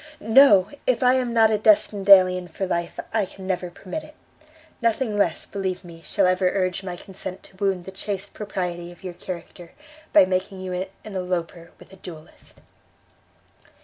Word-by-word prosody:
No, 210 -8 +7 0.2
if 255 0 +2
I 250 0 +5
am 255 -2 0
not 225 -1 +4
a 215 - +1
destined 205 -2 +3
alien 185 -2 +7
for 190 - -4
life 170 -2 -3
I 220 -2 +2
can 190 0 -12
never 180 -1 -2
permit 185 - -7
it. 305 - -15 0.7
Nothing 230 -1 0
less, 200 -6 0
believe 190 -2 -4
me, 170 -2 -12
shall - - +1
ever 185 0 +2
urge 185 -1 -1
my 180 -2 -5
consent 190 +1 -8
to - - -15
wound 190 -3 -1
the 190 - -8
chaste 200 +1 -5
propriety 175 -4 -4
of 175 - -17
your 180 -2 -6
character, 175 -1 -9 0.4
by 310 - +7
making 185 +1 -2
you 185 -1 -5
an 180 +1 -3 0.2
eloper 180 -4 -4
with - - -17
a - - -13
duelist." 165 -4 -13
190 Hz, 175 wpm, -23 LUFS, 180-205 Hz, 0.7 s, No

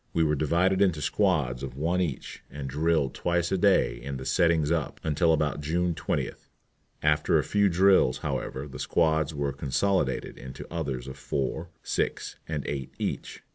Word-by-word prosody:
We 85 - +3
were 75 -1 +2
divided 85 +6 +2
into 90 -6 +3
squads 75 -9 +1
of 65 -1 -6
one 85 +5 +1
each, 80 -7 -4
and 70 -1 -6
drilled 75 0 +1
twice 85 0 0
a 95 - +2
day 95 -10 +3
in 70 +2 -5
the 65 - -7
"settings 80 -3 +2
up" 80 -4 -1
until 80 +2 +2
about 75 -2 +1
June 85 +4 0
20th. - - -3 0.6
After 75 0 +3
a - - +2
few 100 -1 +2
drills, 95 -7 +4
however, 70 +2 -3
the 70 - -9
squads 80 -2 +1
were 70 -1 -1
consolidated 90 +8 0
into 65 0 -8
others 70 -7 -3
of 65 - -8
four, 80 +5 -3
six, - - -2
and 75 -3 -3
eight 70 -2 -4
each. - - -4
80 Hz, 170 wpm, -27 LUFS, 70-85 Hz, 0.6 s, drills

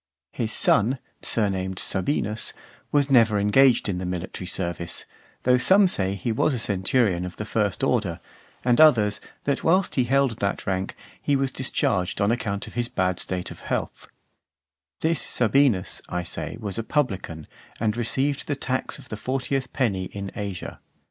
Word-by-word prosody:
His 115 -2 -2
son, 115 +6 +4 0.2
surnamed 95 -4 -1
Sabinus, 105 +2 0 0.4
was 145 -1 +2
never 115 -5 +5
engaged 120 +6 +4
in 90 -3 -2
the 90 - -4
military 90 0 -5
service, 85 -1 -2 0.4
though 125 0 +4
some 195 +7 +5
say 95 - 0
he 100 +5 -2
was 130 +5 +1
a - - -2
centurion 100 -2 +1
of 90 -1 -6
the 105 - -5
first 105 +1 -1
order, 110 -11 +1 0.5
and 125 +3 +4
others, 110 -10 +5 0.2
that 140 - -1
whilst 185 +3 +3
he 130 - +2
held 130 -2 +1
that 100 0 -1
rank, 95 0 -2 0.3
he 145 - +1
was 135 -1 0
discharged 125 -9 0
on 100 +1 +3
account 100 -4 -2
of - - -11
his 120 0 -1
bad 90 -1 0
state 90 -1 -3
of - - -10
health: - - -4 0.9
this 165 +1 +1
Sabinus, 120 -4 +2
I 90 0 -2
say, 85 +4 -4
was 105 -1 -4
a - - -2
publican, 95 - -2 0.3
and 110 -1 0
received 135 +4 0
the 145 - 0
tax 130 -1 -2
of - - -15
the 110 - -5
fortieth 130 +3 -2
penny 100 -8 0
in 100 +1 -6
Asia. 100 -5 -5
110 Hz, 165 wpm, -24 LUFS, 95-130 Hz, 0.9 s, never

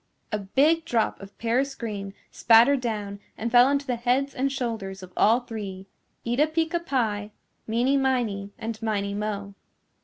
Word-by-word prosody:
A 210 - -1
big 285 +12 +2
drop 235 -8 0
of 195 0 -12
paris 255 +4 0
green 200 -4 -5 0.2
spattered 240 +4 +5
down 210 -4 -3 0.2
and 230 +1 -3
fell 245 +1 +7
onto 280 0 0
the 250 -3 -1
heads 255 +3 +1
and 270 +2 0
shoulders 225 -8 -4
of 185 0 -12
all 230 +4 +4
three, 200 -5 -7 0.4
Eeta 245 +6 +2
Peeca 325 +2 0
Pie, 220 -9 -1 0.4
Meeny 245 +5 +2
Miney 235 -7 0
and 225 0 -5
Miney 200 -2 -1
Mo. 200 -1 -4
230 Hz, 155 wpm, -25 LUFS, 205-265 Hz, 0.4 s, fell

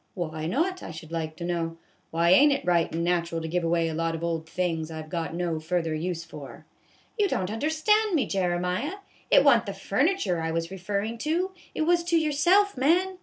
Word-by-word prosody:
" - - -43
Why, 160 -4 -3
not, 340 - 0
I - - -7
should 160 0 -9
like 160 -1 -3
to 170 - -6
know? 165 -1 -2 0.3
Why 170 +1 +2
ain't 285 +10 +7
it 275 - -1
right 175 -2 +2
and 165 +1 -2
natural 170 -1 0
to 160 - -5
give 175 +2 -1
away 165 0 +1
a 160 - -3
lot 165 +1 -1
of 165 - -6
old 165 -1 -2
things 165 -3 -2
I 160 -1 -6
've 155 - -15
got 165 -2 -3
no 170 -2 -1
further 165 0 -1
use 165 +1 -3
for? 150 -3 -11 0.2
" - - -33
" - - -27
You 410 - +4
don't 190 - -2
understand 315 - +2
me, 290 - +2
Jeremiah. 180 - -1 0.3
It - - +6
wa' 280 -4 +7
n't 230 - -6
the 200 - -3
furniture 200 - 0
I 160 - -2
was 165 0 -2
referrin' 200 +4 -3
to; 345 +7 0 0.2
it - - -1
was 340 +1 +3
to 340 -1 +2
yourself, 345 +7 +3
man. 360 +8 +2
180 Hz, 225 wpm, -26 LUFS, -, 0.3 s, ain't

